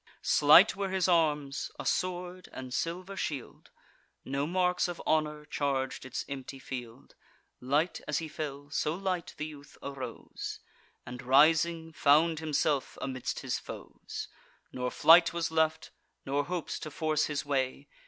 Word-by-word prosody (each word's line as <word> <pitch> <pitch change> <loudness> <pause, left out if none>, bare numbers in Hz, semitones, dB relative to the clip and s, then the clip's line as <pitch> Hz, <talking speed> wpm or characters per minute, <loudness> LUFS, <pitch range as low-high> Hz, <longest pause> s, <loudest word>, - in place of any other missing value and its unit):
Slight 155 +8 +7
were 195 0 -2
his 190 -1 +1
arms, 150 -5 +1
a - - -6
sword 180 0 -2
and 130 -1 -7
silver 180 +6 -3
shield: 145 -8 -5 0.6
No 140 +2 -1
marks 180 +1 +1
of 175 -1 -5
honour 150 -1 +1
charg'd 135 -3 -2
its 130 - -4
empty 135 0 -6
field. 125 -2 -8 0.5
Light 145 +7 0
as 150 - 0
he 165 - -3
fell, 145 -2 -6
so 150 +1 0
light 185 -2 -3
the 150 - -3
youth 145 -2 -11
arose, 140 -2 -6 0.5
And 125 +1 -7
rising, 160 +5 +4
found 155 +2 +4
himself 150 -3 0
amidst 130 -2 -3
his - - -2
foes; - - -8 0.5
Nor 125 0 -2
flight 170 +5 +6
was 170 -1 -1
left, 160 0 +1 0.3
nor 140 +1 0
hopes 175 +1 -3
to 155 - -6
force 155 0 0
his 150 -2 -3
way. 135 0 -1
150 Hz, 145 wpm, -30 LUFS, 140-170 Hz, 0.6 s, Slight